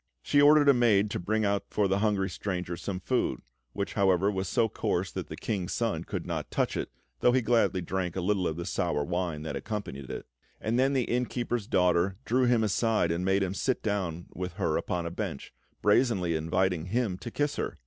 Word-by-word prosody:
She 145 - +3
ordered 145 0 +6
a 140 - +8
maid 105 -5 +3
to - - -2
bring 110 +4 0
out 100 0 0
for 105 -2 +1
the 95 +1 +1
hungry 100 -2 +1
stranger 90 -4 -3
some 90 +1 -4
food, - - 0 0.3
which, 100 - -3
however, 95 -1 +3
was 95 -2 -2
so 115 - +2
coarse - - -1
that - - -5
the - - -7
King's 95 -5 -3
Son - - -1
could - - -4
not - - -3
touch - - 0
it, - - -3 0.3
though 125 - +4
he 130 -1 +2
gladly 110 -5 +2
drank 90 0 -2
a 95 - -1
little 95 0 +1
of 80 - -3
the 85 - -4
sour 85 -5 0
wine 85 -2 -2
that 80 - -4
accompanied 100 - -5
it; - - -6 0.3
and 115 +3 0
then 135 +2 +3
the 130 -2 +2
inn 125 +1 0
keeper's 120 -3 -2
daughter 90 +1 +2
drew 125 +2 +2
him 120 -2 +3
aside 110 -4 +1
and 85 +2 -1
made 95 +1 +2
him 95 -1 -2
sit 130 +6 -1
down 90 -6 -2
with 90 -1 -4
her - - 0
upon 85 -1 -2
a 85 - -3
bench, 70 - -5 0.3
brazenly 105 -6 +3
inviting 85 +1 0
him 110 -1 0
to 120 - -6
kiss 145 +4 -1
her. - - -3
100 Hz, 215 wpm, -29 LUFS, 90-115 Hz, 0.3 s, a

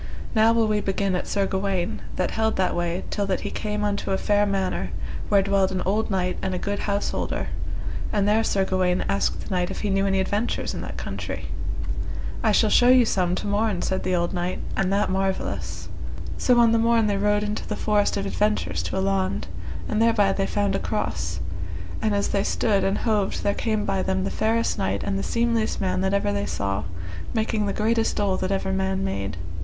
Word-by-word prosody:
Now 220 0 +5
will 230 -1 +3
we 210 -1 +1
begin 195 -1 0
at 180 - -2
Sir 200 -1 +1
Gawaine, 190 -2 -1
that 185 - 0
held 220 0 +1
that 185 - +1
way 175 +1 -1
till 205 -1 -1
that 190 - 0
he - - -4
came 210 -1 -2
unto 205 -1 -1
a 190 - +2
fair 205 +1 +2
manor, 195 -2 -1 0.4
where 200 -2 +5
dwelled 195 -1 +2
an 185 -1 -1
old 215 +4 +1
knight 185 -2 0
and 190 -1 -1
a - - -1
good 200 +2 -2
householder, 200 0 -1 0.6
and 205 -1 +2
there 215 +2 +4
Sir 195 -3 +1
Gawaine 185 -1 +1
asked 195 0 0
the - - -9
knight 180 -1 +1
if - - -5
he 205 - 0
knew 195 0 +2
any 195 0 +2
adventures 205 +5 -1
in - - -4
that - - -6
country. - - -5 0.9
I - - +3
shall - - +3
show 245 - +6
you 255 -1 +7
some 180 -4 +1
to - - -4
morn, 205 -2 +1
said 190 0 0
the 185 - 0
old 175 +1 0
knight, 180 0 -1 0.2
and 195 -1 +1
that 200 -1 +2
marvellous. 190 0 -2 0.5
So, 250 -2 +3
on 230 -1 +6
the 230 - +4
morn 230 -1 +4
they 205 -1 +1
rode 205 +1 +2
into 210 0 -3
the 210 - -2
forest 210 -1 +1
of 100 - -1
adventures 90 -2 0
to 85 0 -3
a - - +1
laund, 95 0 0 0.4
and 215 - 0
thereby 220 -4 +4
they 195 0 0
found 205 -1 0
a - - +1
cross, 90 - -2 0.6
and 215 -2 +1
as 200 - +1
they 200 - +1
stood 205 -2 +1
and 195 +1 +1
hoved 210 -4 0
there 200 - +2
came 215 -1 -1
by 195 -1 0
them 190 0 0
the 195 - -2
fairest 225 +1 +1
knight 95 +1 0
and 95 - -1
the - - -1
seemliest 230 - 0
man 185 -2 0
that 190 0 +1
ever 150 - +1
they 100 0 -1
saw, 100 0 -2 0.5
making 220 -1 +1
the - - 0
greatest 225 +2 +1
dole 200 -2 +1
that 185 - -1
ever 190 0 0
man 190 0 0
made. 100 - -3
195 Hz, 215 wpm, -25 LUFS, 185-210 Hz, 0.9 s, you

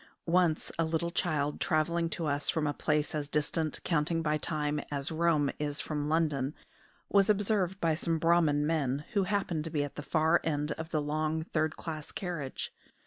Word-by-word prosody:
Once 170 -2 +2
a - - +4
little 165 +1 -1
child, 150 -5 0
travelling 165 +2 +1
to 165 0 -3
us 145 -1 0
from 160 -3 +1
a 145 - 0
place 150 0 0
as 150 -2 -3
distant, 155 +1 0
counting 165 0 +1
by 150 -1 +2
time, 150 -1 -1
as 140 0 -2
Rome 160 -3 +2
is 145 -1 -2
from 150 -1 -2
London, 150 -3 +1 0.5
was 200 0 +4
observed 200 -2 +2
by 165 -3 +2
some 165 +1 0
Brahman 160 -3 +3
men, 150 -3 0
who 200 -3 +2
happened 185 -5 0
to - - -3
be 150 -2 0
at 145 - -7
the - - -3
far 160 +3 +3
end 150 -1 0
of 160 +1 -5
the 155 -3 0
long 155 +1 -1
third 155 -1 -1
class 155 -3 -6
carriage. 170 -8 -4
155 Hz, 185 wpm, -31 LUFS, 150-170 Hz, 0.5 s, a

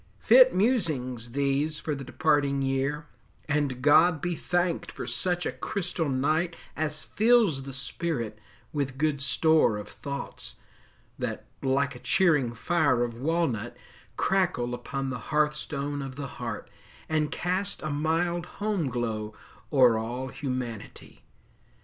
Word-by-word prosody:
Fit - - +7
musings 135 - 0
these 140 +3 +1
for 155 - -3
the 140 -1 -5
departing 140 0 +1
year; 135 +3 -1 0.4
And 145 -4 0
God 160 +2 +6
be 175 +2 -1
thanked 175 0 -1
for - - -6
such 175 -1 -1
a - - 0
crystal 175 -5 -2
night 155 +6 +1 0.2
As 155 0 -2
fills 220 - +3
the 135 +1 -7
spirit 130 -4 -3 0.3
with 135 -3 -2
good 150 -1 0
store 150 -3 +3
of 105 - -7
thoughts, 140 0 -6 0.6
That, - - -3 0.2
like 140 +1 +1
a 125 - -10
cheering 150 -11 +2
fire 145 -2 +2
of 120 0 -5
walnut, 140 -8 -1 0.4
crackle 180 -11 +1
Upon 135 +2 -3
the 125 - -4
hearthstone 150 -1 0
of 135 -1 -6
the 140 0 -5 0.2
heart, - - -4 0.4
and 155 -2 0
cast 185 +3 -1
A 155 - -2
mild 170 +4 0
home 205 -8 0
glow 110 -3 -3 0.4
o'er 125 -5 +5
all 125 +4 -4
Humanity! 125 -5 -6
145 Hz, 130 wpm, -27 LUFS, 130-165 Hz, 0.6 s, Fit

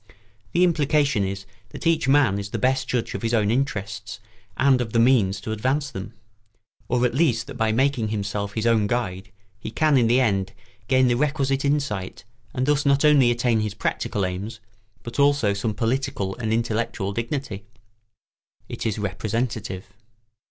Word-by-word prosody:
The 180 - +4
implication 150 - +2
is 100 +1 -4 0.2
that - - -9
each 165 -3 +2
man 135 -8 +4
is 100 0 -5
the - - -3
best 130 +1 +1
judge 125 -2 -2
of 100 - -4
his 115 +1 0
own 105 -1 +2
interests 105 -4 -3 0.4
and 130 -2 +4
of 110 -3 -4
the 115 - +3
means 115 -6 +3
to 110 - -5
advance 135 +7 -1
them; 100 +3 -7 0.7
or 125 0 +1
at 120 - 0
least 130 -5 +2
that 140 - -8
by 110 -3 0
making 125 -1 +1
himself 100 -1 -3
his 110 0 -1
own 115 -3 +3
guide 95 -5 -3 0.3
he - - -6
can 150 +4 +2
in 120 -3 +4
the 120 +3 +4
end 100 -5 0 0.3
gain 130 0 +4
the 120 - +3
requisite 135 0 0
insight 140 -10 -2 0.3
and 130 - -1
thus 145 0 +2
not 140 +1 +3
only 145 -5 +6
attain 120 -1 +1
his 105 -1 -2
practical 100 -1 -2
aims, 100 +5 -5 0.4
but 120 +4 -6
also 140 -7 +3
some 105 +1 -2
political 120 -4 -1
and 110 -2 -2
intellectual 110 -3 -1
dignity. 115 0 -3
[Sidenote: 100 +1 -18 1.0
It - - -5
is 110 - -2
representative. 105 0 -3
115 Hz, 175 wpm, -23 LUFS, 105-135 Hz, 1.0 s, only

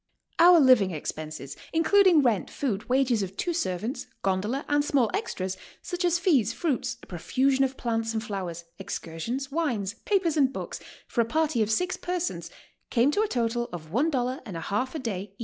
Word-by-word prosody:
"Our 345 0 +8
living 255 -9 +5
ex 150 - -3
penses, 155 -3 -7 0.2
including 340 -1 +5
rent, 230 -7 +1
food, 230 -6 -3
wages 255 -3 +2
of 195 0 -5
two 345 - -1
servants, 230 - -2 0.2
gondola 200 +8 0
and 290 0 +2
small 265 -7 +2
extras, 190 0 -3 0.3
such 355 0 -3
as 350 -1 +3
fees, 275 - +2
fruits, 250 -7 -1
a - - -10
profusion 265 +10 +1
of 265 0 -1
plants 225 -1 -1
and 220 0 -2
flowers, 180 -5 -5
excursions, 200 - -4
wines, 240 - -1
papers 365 -6 +1
and 270 -3 +4
books, - - -6 0.3
for 235 - +1
a - - +1
party 310 -1 +1
of 215 - +1
six 360 +11 0
persons, 360 -1 -3 0.4
came 250 +4 +3
to 410 - +1
a 435 - +2
total 240 - -1
of 160 -3 -8
one 270 - +2
dollar 255 -2 -1
and 185 -6 -7
a - - -5
half 250 - -2
a - - 0
day, 200 -7 -5
each. - - -44
245 Hz, 190 wpm, -27 LUFS, 200-300 Hz, 0.4 s, Our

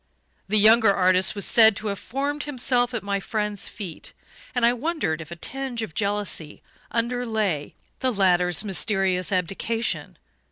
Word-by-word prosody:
The 215 +3 +1
younger 220 +1 +6
artist 185 0 +3
was 200 - -3
said 220 -3 +6
to 215 +1 -4
have 200 - -4
formed 285 +4 -3
himself 250 -3 +1
at 220 - -3
my 200 0 -1
friend's 210 -1 -3
feet, 190 -7 -7 0.4
and 245 -1 +3
I 240 - +4
wondered 250 - -2
if 160 - -10
a 170 - -7
tinge 255 +5 -4
of 190 - -7
jealousy 200 -6 -2 0.3
underlay 225 -9 -2 0.2
the 260 -1 +1
latter's 180 -4 +3
mysterious 195 -2 0
abdication. 195 +5 -2
210 Hz, 150 wpm, -24 LUFS, 190-240 Hz, 0.4 s, younger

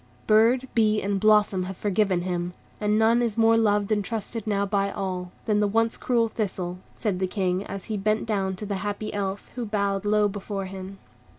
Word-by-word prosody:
"Bird, 230 +4 +4
bee, 215 -2 +3
and 200 -1 -1
blossom 210 -3 +4
have 190 0 -6
forgiven 195 -3 +1
him, 175 -1 -2 0.3
and 210 0 +1
none 225 +2 +4
is 230 -2 -1
more 225 0 +5
loved 210 -2 +2
and 205 -1 +2
trusted 225 0 -4
now 200 -1 +1
by 200 0 0
all, 180 -2 -4
than 210 -2 +2
the 210 - +3
once 225 +2 +1
cruel 235 -2 +1
Thistle," 180 -5 -3 0.2
said 205 -5 -2
the 190 - 0
King, 185 0 -1
as 195 -1 -6
he 215 -2 -3
bent 215 +2 0
down 195 -4 -1
to 210 - -6
the 200 -1 -2
happy 205 +2 -4
Elf, 200 -1 -3
who 245 - -4
bowed 200 -3 -1
low 210 0 +3
before 200 -1 -4
him. 190 +1 -8
205 Hz, 200 wpm, -25 LUFS, 195-215 Hz, 0.3 s, more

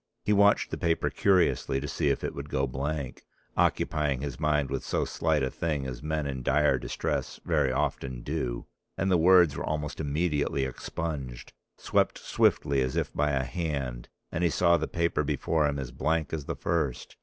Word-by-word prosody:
He 105 - +2
watched 100 0 +4
the - - -4
paper 80 -1 +1
curiously 90 -7 +2
to 70 - -5
see - - 0
if - - 0
it - - -2
would 70 +1 -7
go 70 0 +1
blank, 70 +1 -4 0.3
occupying 75 -4 +1
his 70 -3 -5
mind 75 -3 +1
with 70 - -2
so - - 0
slight 80 -3 0
a 65 - -1
thing 75 -5 -2
as 65 -2 -6
men 75 0 -2
in 65 -2 -3
dire 75 +4 +3
distress - - -3
very 75 -5 +2
often 65 -3 -2
do, - - -3 0.3
and 95 0 0
the 90 - +5
words 85 -3 +6
were - - -4
almost 75 -1 -3
immediately 75 -2 0
expunged, 65 -2 -5 0.2
swept - - +1
swiftly 70 -1 +2
as 65 0 -1
if - - -1
by 75 0 +1
a 70 -2 +1
hand, 70 -7 -3 0.2
and 85 +1 -1
he 85 - +4
saw 85 +1 +4
the 80 -1 -1
paper 85 0 0
before 80 -2 +1
him 70 -1 -1
as 65 -2 -5
blank 80 +5 -1
as 75 -3 -3
the - - -3
first. 75 -7 -2
75 Hz, 190 wpm, -28 LUFS, 65-80 Hz, 0.3 s, words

